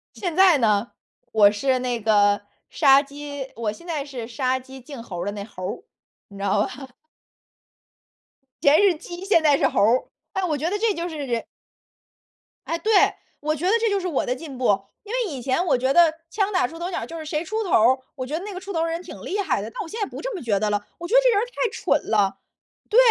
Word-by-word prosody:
现 355 Hz, -5 st, -3 dB
在 375 Hz, -3 st, +6 dB
呢， 215 Hz, -2 st, +1 dB, 0.4 s
我 205 Hz, -2 st, +6 dB
是 255 Hz, +5 st, +1 dB
那 245 Hz, -2 st, -2 dB
个 205 Hz, -1 st, +3 dB, 0.3 s
杀 275 Hz, 0 st, +5 dB
鸡 285 Hz, -1 st, -7 dB
我 225 Hz, -2 st, -2 dB
现 280 Hz, +11 st, -13 dB
在 320 Hz, -5 st, -2 dB
是 260 Hz, -5 st, -7 dB
“杀 255 Hz, +2 st, -1 dB
鸡 265 Hz, 0 st, -12 dB
儆 265 Hz, -1 st, -9 dB
猴 180 Hz, -7 st, -6 dB
儿” -, -, -3 dB
的 205 Hz, -, -1 dB
那 205 Hz, -1 st, -5 dB
猴 195 Hz, -3 st, -10 dB
儿， 390 Hz, -, -5 dB, 0.5 s
你 200 Hz, -, -12 dB
知 200 Hz, -, -6 dB
道 200 Hz, +1 st, +2 dB
吧？ 265 Hz, +1 st, -9 dB, 1.7 s
以 -, -, -7 dB
前 295 Hz, +6 st, +6 dB
是 390 Hz, -4 st, +4 dB
鸡， 345 Hz, +3 st, -9 dB
现 395 Hz, -4 st, +4 dB
在 295 Hz, -2 st, +5 dB
是 -, -, +3 dB
猴 -, -, -1 dB
儿。 235 Hz, +5 st, +4 dB, 0.3 s
哎， 380 Hz, -, -1 dB
我 315 Hz, -5 st, 0 dB
觉 305 Hz, +4 st, -2 dB
得 410 Hz, -, -1 dB
这 445 Hz, -1 st, +2 dB
就 340 Hz, 0 st, -3 dB
是 320 Hz, -, -7 dB
人 245 Hz, -5 st, -2 dB, 1.2 s
哎， 330 Hz, -, -1 dB
对， 425 Hz, +7 st, -1 dB, 0.5 s
我 305 Hz, +1 st, -1 dB
觉 315 Hz, +4 st, -4 dB
得 375 Hz, -, +3 dB
这 455 Hz, 0 st, +1 dB
就 400 Hz, -1 st, +1 dB
是 370 Hz, -, -3 dB
我 315 Hz, -7 st, 0 dB
的 250 Hz, -, -1 dB
进 275 Hz, -1 st, -9 dB
步。 205 Hz, -6 st, +2 dB, 0.2 s
因 420 Hz, +2 st, -8 dB
为 480 Hz, -8 st, -1 dB
以 260 Hz, -, -6 dB
前 265 Hz, +8 st, 0 dB
我 260 Hz, -, +3 dB
觉 260 Hz, +2 st, +1 dB
得 340 Hz, -2 st, +6 dB, 0.2 s
枪 400 Hz, +2 st, 0 dB
打 365 Hz, -10 st, +2 dB
出 330 Hz, -, -11 dB
头 345 Hz, +2 st, -4 dB
鸟 375 Hz, -, -3 dB
儿， -, -, -6 dB
就 330 Hz, -, -7 dB
是 315 Hz, -, -7 dB
谁 305 Hz, 0 st, -2 dB
出 435 Hz, +6 st, -2 dB
头 385 Hz, -, -5 dB
儿， 250 Hz, +4 st, +5 dB, 0.2 s
我 260 Hz, -3 st, -4 dB
觉 300 Hz, +5 st, -3 dB
得 360 Hz, -, -6 dB
那 415 Hz, -, -6 dB
个 365 Hz, -, -5 dB
出 390 Hz, +1 st, -7 dB
头 330 Hz, -, 0 dB
儿 -, -, +2 dB
的 330 Hz, -, -2 dB
人 335 Hz, +1 st, -3 dB
挺 -, -, -10 dB
厉 410 Hz, -, -3 dB
害 400 Hz, -, 0 dB
的。 -, -, -6 dB
但 -, -, -5 dB
我 360 Hz, -, -6 dB
现 440 Hz, -, -7 dB
在 -, -, +2 dB
不 -, -, -8 dB
这 -, -, -4 dB
么 365 Hz, -, -6 dB
觉 210 Hz, -6 st, +1 dB
得 210 Hz, +1 st, 0 dB
了， 205 Hz, 0 st, -1 dB
我 345 Hz, -, -5 dB
觉 440 Hz, -, +1 dB
得 -, -, +8 dB
这 -, -, +4 dB
人 420 Hz, -4 st, +3 dB
儿 445 Hz, -, 0 dB
太 -, -, -2 dB
蠢 -, -, -1 dB
了。 195 Hz, -3 st, +2 dB, 0.5 s
对， 440 Hz, -, 0 dB
290 Hz, 280 characters per minute, -23 LUFS, 240-365 Hz, 1.7 s, 得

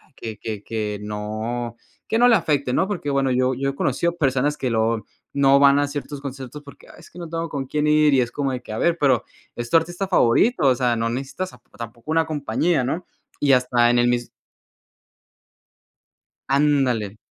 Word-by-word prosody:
que 110 Hz, -2 st, -7 dB
que 105 Hz, -3 st, -6 dB
que 105 Hz, -2 st, -3 dB
no 110 Hz, +3 st, -4 dB, 0.3 s
que 225 Hz, -, 0 dB
no 245 Hz, +1 st, +6 dB
le 235 Hz, -, +6 dB
afecte, 150 Hz, -8 st, 0 dB
¿no?, 190 Hz, -, +2 dB
porque 185 Hz, -8 st, -3 dB
bueno, 135 Hz, -1 st, +1 dB
yo 130 Hz, +1 st, +2 dB
yo 135 Hz, +2 st, -1 dB
he 140 Hz, -, -5 dB
conocido 170 Hz, +6 st, 0 dB
personas 140 Hz, -1 st, +1 dB
que 130 Hz, -, -2 dB
lo 110 Hz, -2 st, 0 dB, 0.3 s
no 140 Hz, 0 st, +4 dB
van 140 Hz, 0 st, +6 dB
a 145 Hz, -, +1 dB
ciertos 145 Hz, 0 st, -6 dB
conciertos 140 Hz, +1 st, -8 dB
porque: 140 Hz, -, -15 dB
"Ah, -, -, -15 dB
es -, -, -15 dB
que -, -, -12 dB
no 170 Hz, -2 st, -7 dB
tengo 165 Hz, 0 st, -3 dB
con 135 Hz, -2 st, -4 dB
quién 150 Hz, +2 st, -1 dB
ir", 150 Hz, -1 st, +4 dB
y 130 Hz, -, +4 dB
es 120 Hz, -1 st, -2 dB
como 140 Hz, -2 st, -2 dB
de 125 Hz, -, -4 dB
que: 120 Hz, -, -11 dB
"A 110 Hz, -, -4 dB
ver, 170 Hz, +5 st, +1 dB
pero 135 Hz, -6 st, +2 dB, 0.3 s
es 120 Hz, 0 st, -4 dB
tu -, -, 0 dB
artista 175 Hz, +4 st, -2 dB
favorito", 180 Hz, -, +3 dB
o 130 Hz, -, +5 dB
sea, 125 Hz, -1 st, +1 dB
no 115 Hz, 0 st, -1 dB
necesitas 135 Hz, +10 st, -4 dB
tapo -, -, -20 dB
tampoco 115 Hz, +3 st, -9 dB
una 165 Hz, 0 st, +2 dB
compañía, 155 Hz, 0 st, 0 dB
¿no?, 165 Hz, +7 st, -3 dB, 0.4 s
y 145 Hz, -, +3 dB
hasta 125 Hz, -2 st, +3 dB
en 120 Hz, 0 st, +3 dB
el 120 Hz, -, +3 dB
mis 120 Hz, 0 st, 0 dB, 2.2 s
Ándale. 135 Hz, -7 st, +1 dB
135 Hz, 205 wpm, -22 LUFS, 120-150 Hz, 2.2 s, no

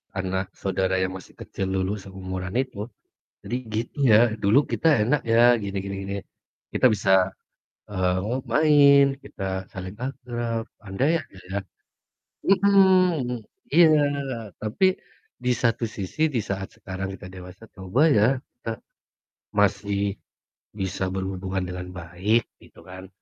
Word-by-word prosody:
anak 95 Hz, 0 st, -2 dB
saudara 95 Hz, -1 st, -1 dB
yang 95 Hz, 0 st, -1 dB
masih 95 Hz, -, -14 dB
kecil 95 Hz, -, -5 dB
dulu 95 Hz, +2 st, -1 dB
seumuran 95 Hz, -1 st, -6 dB
itu. 110 Hz, -6 st, -6 dB, 0.6 s
Jadi 120 Hz, -, -2 dB, 0.2 s
gitu 115 Hz, +5 st, -3 dB, 0.2 s
ya, 105 Hz, -, +8 dB, 0.2 s
dulu 110 Hz, +8 st, +3 dB
kita 165 Hz, -, +1 dB, 0.2 s
enak 140 Hz, +4 st, +2 dB
ya 120 Hz, +1 st, +5 dB
gini 100 Hz, -2 st, -5 dB
gini 100 Hz, 0 st, -4 dB
gini. 100 Hz, +1 st, -4 dB, 0.6 s
Kita -, -, +3 dB
bisa, 95 Hz, -2 st, +3 dB, 0.6 s
eee, 90 Hz, -2 st, +1 dB
ngo 115 Hz, +5 st, -1 dB
main 145 Hz, -2 st, +6 dB, 0.2 s
kita 95 Hz, -1 st, -5 dB
saling 95 Hz, +1 st, -7 dB
akrab, 120 Hz, -4 st, -3 dB, 0.2 s
andai 115 Hz, +11 st, 0 dB
aja 95 Hz, -, -17 dB
ya 100 Hz, -, -1 dB, 0.9 s
mhm, 185 Hz, -, +4 dB, 0.3 s
iya 165 Hz, -1 st, +7 dB, 0.7 s
tapi 110 Hz, -, +1 dB, 0.5 s
di 125 Hz, 0 st, -1 dB
satu 115 Hz, 0 st, +2 dB
sisi 110 Hz, -, -1 dB
di -, -, +3 dB
saat 95 Hz, -1 st, -3 dB
sekarang 95 Hz, 0 st, -5 dB
kita 90 Hz, -, -11 dB
dewasa 90 Hz, +4 st, -11 dB
coba 95 Hz, +8 st, -1 dB
ya, 110 Hz, -3 st, +5 dB, 0.3 s
kita 115 Hz, -2 st, -4 dB, 0.8 s
masih 100 Hz, 0 st, +1 dB, 0.6 s
bisa 95 Hz, -2 st, -3 dB
berhubungan 95 Hz, 0 st, -3 dB
dengan 90 Hz, 0 st, -6 dB
baik 90 Hz, +6 st, 0 dB, 0.2 s
gitu -, -, -17 dB
kan. 95 Hz, 0 st, -10 dB
100 Hz, 130 wpm, -25 LUFS, 95-120 Hz, 0.9 s, ya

